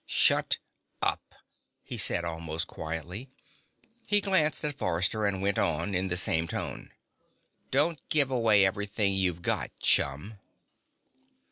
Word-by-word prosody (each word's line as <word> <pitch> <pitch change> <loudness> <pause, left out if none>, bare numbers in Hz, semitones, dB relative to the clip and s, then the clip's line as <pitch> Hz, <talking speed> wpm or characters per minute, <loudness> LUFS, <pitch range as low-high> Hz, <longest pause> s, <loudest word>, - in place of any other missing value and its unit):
"Shut - - +3 0.5
up," - - 0 0.6
he - - -5
said, 85 - +1
almost 80 -1 -4
quietly. 80 - -6 0.7
He 205 - +4
glanced 190 -7 +2
at 145 -1 -1
Forrester 95 0 0
and 95 -1 -2
went 100 0 0
on, 85 +5 0
in 95 +1 0
the 90 -1 0
same 80 -2 +1
tone: - - -5 0.8
"Don't 150 +3 +1
give 140 -3 +4
away 110 -5 +4
everything 100 +1 0
you've 90 -3 -1
got, - - -1
chum." 75 +10 +1
95 Hz, 125 wpm, -28 LUFS, 85-115 Hz, 0.8 s, He